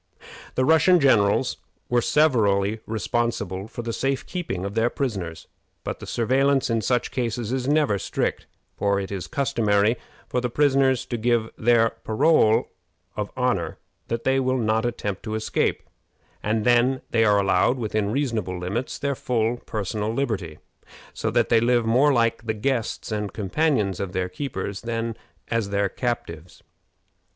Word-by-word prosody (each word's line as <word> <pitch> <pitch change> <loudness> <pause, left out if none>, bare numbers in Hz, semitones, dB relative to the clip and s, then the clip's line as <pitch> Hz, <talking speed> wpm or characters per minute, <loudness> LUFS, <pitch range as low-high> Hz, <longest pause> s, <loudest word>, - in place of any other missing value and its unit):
The 130 - +2
Russian 160 +4 +5
generals 105 -8 +3 0.3
were 120 0 +2
severally 110 -9 +2
responsible 110 -4 -2
for 120 - -7
the 115 0 -3
safe 135 +3 -1
keeping 100 - -4
of 100 - -4
their 115 +2 +2
prisoners; 100 - -4 0.4
but - - -4
the - - -9
surveillance 135 +2 +2
in 115 -1 +1
such 120 +2 0
cases 120 -2 -2
is 130 -1 -1
never 145 -8 +2
strict, - - -2 0.3
for 100 -1 +1
it 95 0 -5
is 95 -3 -4
customary 110 -4 +1 0.3
for 125 - -1
the 125 - -1
prisoners 135 -1 +2
to 120 - -3
give 115 -1 +1
their 115 0 +3
parole 110 -1 +3 0.4
of 105 -1 -3
honor 120 -11 0 0.3
that 115 0 -3
they 135 0 +2
will 130 0 +1
not 110 0 +1
attempt 105 -5 -4
to 110 -1 -4
escape, 110 0 0 0.6
and 110 0 0
then 125 +2 +3
they 115 -1 +3
are 105 -2 +4
allowed, 100 +5 +2
within 110 -3 -1
reasonable 115 -9 -1
limits, 100 +8 -3
their 140 0 -1
full 120 -2 0
personal 105 0 -2
liberty, 110 - -2 0.6
so - - -2
that - - +1
they 115 - +5
live 120 0 +2
more 130 +6 +4
like 115 -2 +1
the 110 - 0
guests 115 0 -2
and 105 -1 -3
companions 105 - 0
of 95 -2 -4
their 95 -1 -1
keepers 100 -2 -4
than 115 -1 -3 0.3
as 115 -3 0
their 100 0 +1
captives. 90 -10 -4
115 Hz, 155 wpm, -24 LUFS, 100-125 Hz, 0.6 s, Russian